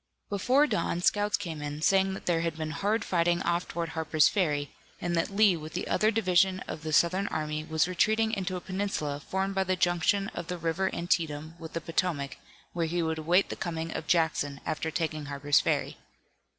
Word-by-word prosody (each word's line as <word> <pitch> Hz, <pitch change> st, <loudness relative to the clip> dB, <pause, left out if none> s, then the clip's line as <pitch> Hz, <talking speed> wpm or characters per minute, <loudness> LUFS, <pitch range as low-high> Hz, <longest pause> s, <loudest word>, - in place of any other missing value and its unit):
Before 250 Hz, +9 st, +3 dB
dawn, 170 Hz, -, -1 dB
scouts 205 Hz, +1 st, +2 dB
came 165 Hz, -7 st, -5 dB
in, 145 Hz, +1 st, -5 dB
saying 190 Hz, +1 st, +3 dB
that -, -, -9 dB
there 165 Hz, -2 st, +2 dB
had 165 Hz, -1 st, -2 dB
been 155 Hz, -1 st, -3 dB
hard 205 Hz, +6 st, 0 dB
fighting 175 Hz, -1 st, +2 dB
off 170 Hz, +1 st, 0 dB
toward 170 Hz, -1 st, -3 dB
Harper's 160 Hz, -2 st, +3 dB
Ferry, 150 Hz, -8 st, 0 dB, 0.3 s
and 175 Hz, 0 st, -1 dB
that 165 Hz, -, +1 dB
Lee 200 Hz, -2 st, +4 dB
with 155 Hz, -1 st, -8 dB
the 180 Hz, -, -3 dB
other 215 Hz, -, +3 dB
division 190 Hz, -3 st, +3 dB
of 155 Hz, -, -6 dB
the 155 Hz, 0 st, -4 dB
Southern 185 Hz, +5 st, +3 dB
army 155 Hz, 0 st, -2 dB
was 160 Hz, +1 st, +1 dB
retreating 220 Hz, +5 st, +2 dB
into 190 Hz, -3 st, -2 dB
a 180 Hz, -, -4 dB
peninsula 185 Hz, -7 st, -2 dB
formed 190 Hz, +6 st, -2 dB
by 190 Hz, 0 st, +1 dB
the 185 Hz, 0 st, 0 dB
junction 180 Hz, +2 st, +1 dB
of 170 Hz, -1 st, -7 dB
the 180 Hz, -, -3 dB
river 170 Hz, +3 st, 0 dB
Antietam 160 Hz, -2 st, -1 dB
with 160 Hz, -1 st, -9 dB
the 165 Hz, -, -3 dB
Potomac, 160 Hz, -4 st, -1 dB, 0.4 s
where 170 Hz, -1 st, 0 dB
he 170 Hz, +1 st, -1 dB
would 160 Hz, 0 st, -1 dB
await 175 Hz, +5 st, +3 dB
the -, -, -4 dB
coming 165 Hz, -1 st, -4 dB
of 160 Hz, -, -4 dB
Jackson, 150 Hz, -4 st, +1 dB
after 155 Hz, +1 st, -2 dB
taking 155 Hz, -2 st, -2 dB
Harper's 145 Hz, 0 st, +2 dB
Ferry. -, -, -1 dB
170 Hz, 200 wpm, -29 LUFS, 160-190 Hz, 0.4 s, Lee